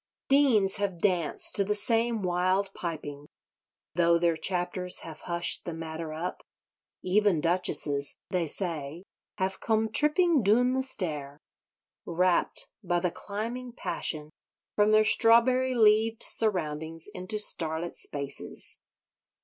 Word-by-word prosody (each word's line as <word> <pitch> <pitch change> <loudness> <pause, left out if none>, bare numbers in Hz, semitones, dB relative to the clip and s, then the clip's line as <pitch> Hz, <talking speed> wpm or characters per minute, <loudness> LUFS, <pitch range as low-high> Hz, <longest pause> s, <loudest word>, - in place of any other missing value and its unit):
Deans 255 -9 +4
have 200 -3 -2
danced 175 -4 +2
to 200 - +3
the 210 +2 -1
same 225 +1 0
wild 185 +2 0
piping, 145 -4 -6 0.7
though 170 0 +3
their 170 -1 +1
chapters 180 +1 -1
have 160 -2 -10
hushed 170 0 0
the 170 - -6
matter 160 0 -6
up. 165 +4 -5 0.6
Even 195 -2 +2
Duchesses 150 -4 +1
(they 175 -3 0
say) 160 -1 -2 0.3
have 190 -1 -2
"come 220 -1 0
tripping 300 +3 +3
doon 240 +5 +3
the 265 - 0
stair," 150 - -2 0.7
rapt 180 +1 +1 0.2
by 175 -1 0
the 175 0 -1
climbing 230 +6 -6
passion 155 -9 -4 0.4
from 210 0 +3
their 215 0 +5
strawberry 250 +4 +4
leaved 220 0 +3
surroundings 165 -6 0
into 185 +4 -4
starlit 170 -4 -1
spaces. 140 -1 -4
185 Hz, 120 wpm, -28 LUFS, 165-215 Hz, 0.7 s, their